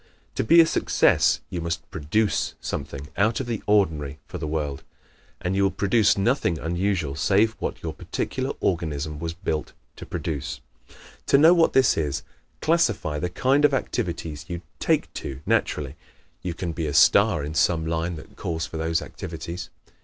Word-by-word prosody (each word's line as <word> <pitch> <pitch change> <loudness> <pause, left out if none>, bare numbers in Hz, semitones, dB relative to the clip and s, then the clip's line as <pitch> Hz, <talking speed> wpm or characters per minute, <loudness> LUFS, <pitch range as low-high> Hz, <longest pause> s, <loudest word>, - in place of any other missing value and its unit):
To - - -1
be 165 +10 +6
a 165 - +9
success - - +3
you 85 - -3
must 85 +1 -3
PRODUCE 95 +8 0
something 70 +1 -5
out 110 +3 +2
of 135 - -2
the 115 -3 -3
ordinary 80 -9 +2
for - - -7
the 80 - -3
world. 75 -3 -2 0.6
And 90 +1 -2
you 100 - +2
will 100 - +4
produce 100 +3 +3
nothing 100 - +1
unusual 85 -2 -1
save 100 +9 +3
what - - -4
your - - -3
particular - - -3
organism 75 -4 -1
was 85 0 -3
built 80 -3 -3 0.2
to - - -9
produce. 75 -3 -4 0.7
To - - +6
know 160 +4 +7
what 170 -2 +3
this 130 -2 +4
is, 70 -5 -1 0.4
classify 115 - +1
the 90 - -2
kind 135 +10 +2
of 145 -2 +5
activities 85 - -3
you 85 -1 -5 0.2
"take - - +1
to" 70 0 -6
naturally. 70 -1 0 0.5
You 90 -2 -4
can 85 0 -3
be 80 -1 -3
a 70 - -3
star 75 - +5
in 75 +2 -4
some 80 0 +2
line 85 +1 -1
that 75 - -12
calls 80 -1 -3
for 80 - -7
those 80 0 0
activities. 85 0 -7
85 Hz, 170 wpm, -25 LUFS, 75-100 Hz, 0.7 s, a